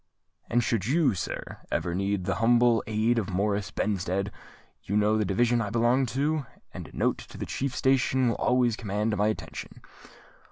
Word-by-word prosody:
"And 120 +1 +2
should 110 -3 0
you, 150 -1 +3
sir, 95 - -5
ever 85 - -1
need 100 0 -1
the 95 - 0
humble 120 0 +4
aid 110 +2 +2
of 100 - -3
Morris 100 +1 0
Benstead, 100 -1 -1 0.5
you 100 - -1
know 105 +1 +3
the 110 -1 +1
Division 120 +5 +2
I 105 - -2
belong 120 +4 +2
to, 140 +3 -1 0.3
and - - -7
a - - -13
note - - +1
to - - -11
the - - -4
chief 135 -1 -3
station 130 -1 +2
will - - 0
always 125 -2 +2
command 105 0 -1
my 105 +1 +2
attention." 110 - -5
115 Hz, 175 wpm, -27 LUFS, 100-120 Hz, 0.5 s, humble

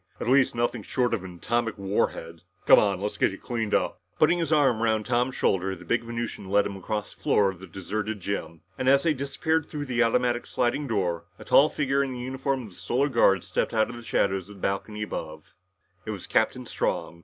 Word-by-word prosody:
"At - - -4
least, 130 0 +4
nothing 120 0 0
short 120 +3 0
of 105 -5 -1
an 90 -1 -9
atomic 115 +5 -1
war 100 0 +1
head! 80 0 -10 0.2
Come - - +8
on. 100 -3 +1
Let's 105 +2 -3
get - - +3
you 100 - -8
cleaned 115 -4 -2
up!" - - -1 0.2
Putting 170 +3 +4
his 165 -2 -1
arm 135 -7 +3
around 110 -2 +1
Tom's 125 +1 0
shoulder, 95 0 +1
the 90 0 -13
big 115 +7 +1
Venusian 115 -4 -5
led 100 +1 +3
him 100 - -4
across 105 +2 -4
the - - -27
floor 100 -2 +3
of 95 - -14
the 95 - -10
deserted 105 +3 -4
gym, 90 -4 -4 0.2
and 130 - +2
as 140 0 +5
they 165 -2 +3
disappeared 150 +3 -1
through 145 -2 -5
the 125 -2 0
automatic 120 +1 +1
sliding 125 +4 0
doors, 90 -7 0 0.2
a - - -12
tall 150 +3 +6
figure 140 -1 +1
in 135 -1 -3
the 125 - -6
uniform 130 +1 -2
of 110 - -9
the 90 - -17
Solar 120 +9 0
Guard 95 -7 +4
stepped - - -2
out 110 +1 +2
of - - -8
the 120 - -8
shadows 95 -4 0
on 105 - -11
the - - -15
balcony 105 +3 -2
above. 80 -6 -7 0.5
It - - -8
was 100 -4 -5
Captain 125 +3 +1
Strong. 85 -6 -2
115 Hz, 230 wpm, -26 LUFS, 100-130 Hz, 0.5 s, Come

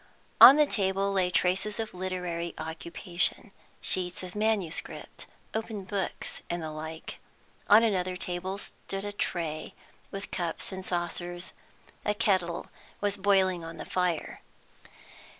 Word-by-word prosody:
On 270 - +13
the 300 0 +5
table 195 -5 0
lay 185 -2 +2
traces 185 +5 +2
of 220 -1 -3
literary 180 -2 -3
occupation, 170 +5 -1 0.3
sheets 180 0 +1
of 180 -1 -7
manuscript, 210 -6 -1 0.3
open 220 -2 -3
books, 190 0 -2
and 170 -1 -2
the 155 - -4
like. 160 +1 -7 0.5
On 215 +3 +8
another 185 -4 +1
table 185 +1 -3
stood 195 -1 -5
a 205 - -3
tray, 165 -6 -3 0.3
with 195 0 -7
cups 175 0 -3
and 190 0 -5
saucers. 175 0 -3 0.5
A 210 - +1
kettle 185 -6 0 0.3
was 205 0 +2
boiling 190 -3 +3
on 165 0 -8
the - - -6
fire. 180 -3 -1
185 Hz, 130 wpm, -29 LUFS, 175-200 Hz, 0.5 s, On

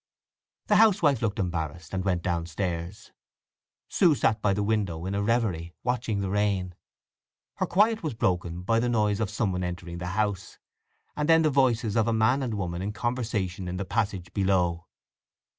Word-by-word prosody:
The 210 - +3
housewife 180 - +4
looked 110 -2 -1
embarrassed, 85 -4 -3
and 95 -1 -1
went 90 -3 0
downstairs. 85 +1 -3 0.8
Sue 170 -6 +3
sat 110 -5 +1
by 100 - +2
the 100 +1 0
window 100 -6 -1
in 95 - -3
a 100 - 0
reverie, 100 -7 -1
watching 120 -4 -1
the 95 -1 -2
rain. 100 -3 0 0.8
Her - - 0
quiet 215 +4 +3
was 155 -7 -3
broken 90 -3 -1
by 115 +4 +2
the 120 +1 0
noise 105 -3 +1
of 110 -3 -1
someone 95 -4 -1
entering 90 -1 -5
the 90 - -4
house, 105 -3 -2 0.6
and 150 +1 -1
then 160 0 +6
the 155 - +3
voices 120 -5 +2
of 115 -1 +2
a 115 - +2
man 110 +5 +3
and 120 -5 -2
woman 90 -3 -3
in 100 +2 -3
conversation 105 -6 -2
in 90 +1 -4
the 100 - -3
passage 95 -4 -2
below. 90 -4 +1
100 Hz, 175 wpm, -27 LUFS, 90-115 Hz, 0.8 s, then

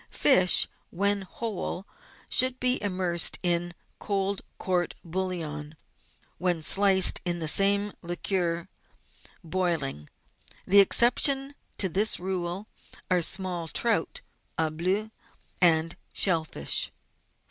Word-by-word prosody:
3. - - -13
Fish, 185 -11 +5 0.2
when 200 +2 -1
whole, 195 -1 -6 0.4
should 255 0 +3
be 250 +1 +3
immersed 185 -4 0
in 175 0 0 0.3
cold 200 -1 -3 0.2
court 180 -2 -2
bouillon; 165 -4 -5 0.6
when 175 -1 -1
sliced, 190 +1 +5
in 175 -1 -2
the 160 -2 -4
same 200 +4 +3
liquor, 175 0 -3 0.8
boiling. 160 - -3 0.6
The 200 +1 +7
ex 195 - +4
ceptions 270 +3 +2 0.2
to 195 - +2
this 200 +5 0
rule 185 +2 -5 0.4
are 180 -1 +2
small 180 -1 -1
trout 235 - 0 0.2
" - - -40
au 160 -1 -1
bleu 190 +7 -2 0.3
" - - -34 0.2
and 165 -1 +3 0.2
shell 165 -5 +1
fish. 70 - -1
185 Hz, 115 wpm, -26 LUFS, 170-200 Hz, 0.8 s, The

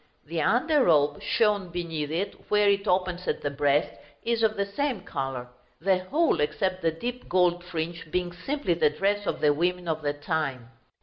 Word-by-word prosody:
The 160 +1 -2
under 270 - +3
robe, 145 -3 +3
shown 210 -5 +1
beneath 165 -4 -3
it 185 +6 -2 0.2
where 210 -1 +4
it 200 0 +2
opens 180 -1 0
at - - -1
the 145 - -1
breast, 145 +1 +1 0.2
is 230 0 0
of 220 -1 +2
the 200 - +1
same 245 +1 -2
color; 135 -7 -4 0.3
the 190 +2 +2
whole, 320 - +2
except 185 +5 0
the 165 - +3
deep 245 +10 -5
gold 175 -1 +2
fringe, 165 -2 -5
being 175 +1 -1
simply 270 - -1
the 165 -2 +3
dress 200 +6 0
of - - -2
the 145 -1 +5
women 175 +3 -1
of 160 -1 -1
the 145 -1 0
time. 145 -5 -3
175 Hz, 185 wpm, -27 LUFS, 155-200 Hz, 0.3 s, the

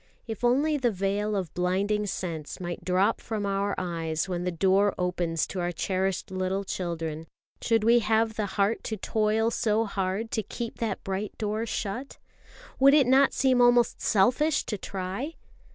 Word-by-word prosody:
If 225 0 -6
only 285 +6 +3
the 255 -3 +1
veil 205 +1 -1
of 185 -5 -3
blinding 200 +4 0
sense 165 -5 -5
might 175 -1 -5
drop 190 +4 +1
from 215 -3 -3
our 200 0 0
eyes 165 -2 -2
when 180 -1 -3
the 180 - 0
door 195 +3 +2
opens 175 -3 -1
to 190 - -6
our 175 0 -1
cherished 190 +2 -2
little 185 +1 -1
children, 165 -4 -4 0.3
should 225 -2 +2
we 235 +2 +5
have 220 0 +1
the 210 -1 -2
heart 200 +3 +1
to 220 - -3
toil 220 +2 +1
so 225 0 +1
hard 195 +2 -2
to 220 - 0
keep 230 +3 -6
that 220 -4 -2
bright 195 +2 -4
door 215 +1 -2
shut? 225 +6 -4 0.6
Would 275 +2 +7
it 285 -3 +5
not 265 +2 +5
seem 260 -2 +3
almost 245 -1 +4
selfish 255 +9 +2
to 210 - -4
try? 195 - -4
205 Hz, 170 wpm, -27 LUFS, 185-230 Hz, 0.6 s, Would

